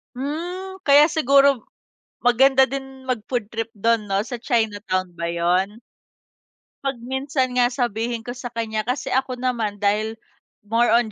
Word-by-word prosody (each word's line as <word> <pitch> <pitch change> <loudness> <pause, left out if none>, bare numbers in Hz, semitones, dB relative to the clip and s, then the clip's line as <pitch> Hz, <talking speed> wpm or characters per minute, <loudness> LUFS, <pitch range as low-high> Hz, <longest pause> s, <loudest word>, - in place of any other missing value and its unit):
Hmm, 355 +8 -5
kaya 290 -2 +7
siguro 280 -4 +4 0.6
maganda 265 +2 +5
din 270 -1 -6
mag-food 240 -1 -2
trip 225 0 -3
'don 230 +1 +2
'no, 195 0 +1
sa 245 0 -5
Chinatown 205 -7 -1
ba 170 - -2
'yon? 180 +5 0 1.0
'Pag 275 -1 -1
minsan 265 0 -1
nga 245 - +5
sabihin 235 -2 -2
ko 245 - -5
sa 250 0 -6
kanya, 220 -2 -3
kasi 250 +3 -2
ako 260 0 0
naman 240 -4 -1
dahil 215 +2 +1 0.5
more 230 +3 +2
on 235 -2 +2
245 Hz, 140 wpm, -22 LUFS, 220-270 Hz, 1.0 s, kaya